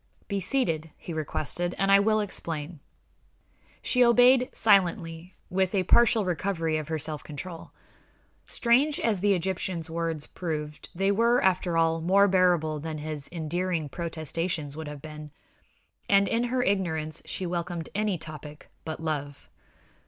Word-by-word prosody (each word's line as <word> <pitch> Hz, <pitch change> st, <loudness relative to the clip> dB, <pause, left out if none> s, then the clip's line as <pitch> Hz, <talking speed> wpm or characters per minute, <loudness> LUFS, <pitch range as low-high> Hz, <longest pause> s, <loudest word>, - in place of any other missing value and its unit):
"Be 200 Hz, -1 st, -1 dB
seated," 170 Hz, -, -1 dB
he 170 Hz, -, -7 dB
requested, 160 Hz, +3 st, -2 dB
"and 195 Hz, +1 st, +2 dB
I 195 Hz, -, +8 dB
will 215 Hz, +1 st, +2 dB
explain." 165 Hz, -5 st, -4 dB, 1.0 s
She 250 Hz, -1 st, +3 dB
obeyed 245 Hz, +2 st, +5 dB
silently, 175 Hz, -4 st, +1 dB, 0.2 s
with 190 Hz, +1 st, +1 dB
a 190 Hz, -, +2 dB
partial 230 Hz, +2 st, +4 dB
recovery 170 Hz, -3 st, -1 dB
of 155 Hz, -2 st, -4 dB
her 160 Hz, 0 st, -1 dB
self 150 Hz, 0 st, -3 dB
control. 165 Hz, +3 st, -8 dB, 0.8 s
Strange 265 Hz, +5 st, +2 dB
as 215 Hz, -5 st, +1 dB
the 200 Hz, +1 st, +3 dB
Egyptian's 180 Hz, -2 st, -3 dB
words 165 Hz, -2 st, -2 dB
proved, 150 Hz, -3 st, -5 dB
they 195 Hz, +2 st, +2 dB
were, 235 Hz, +4 st, +3 dB
after 180 Hz, -2 st, +2 dB
all, 165 Hz, 0 st, +2 dB
more 195 Hz, +4 st, +4 dB
bearable 175 Hz, -5 st, +2 dB
than 155 Hz, +1 st, -5 dB
his 150 Hz, -2 st, -5 dB
endearing 170 Hz, -1 st, -2 dB
protestations 165 Hz, -2 st, -3 dB
would 160 Hz, 0 st, -6 dB
have 150 Hz, -1 st, -8 dB
been, 150 Hz, -1 st, -8 dB, 0.8 s
and 200 Hz, 0 st, +5 dB
in 235 Hz, +1 st, +1 dB
her 250 Hz, +1 st, 0 dB
ignorance 160 Hz, -7 st, -1 dB
she 185 Hz, -, -4 dB
welcomed 170 Hz, -1 st, -3 dB
any 210 Hz, -2 st, 0 dB
topic 150 Hz, -1 st, -7 dB
but 160 Hz, -1 st, -5 dB
love. 145 Hz, -3 st, -4 dB
175 Hz, 145 wpm, -27 LUFS, 155-195 Hz, 1.0 s, I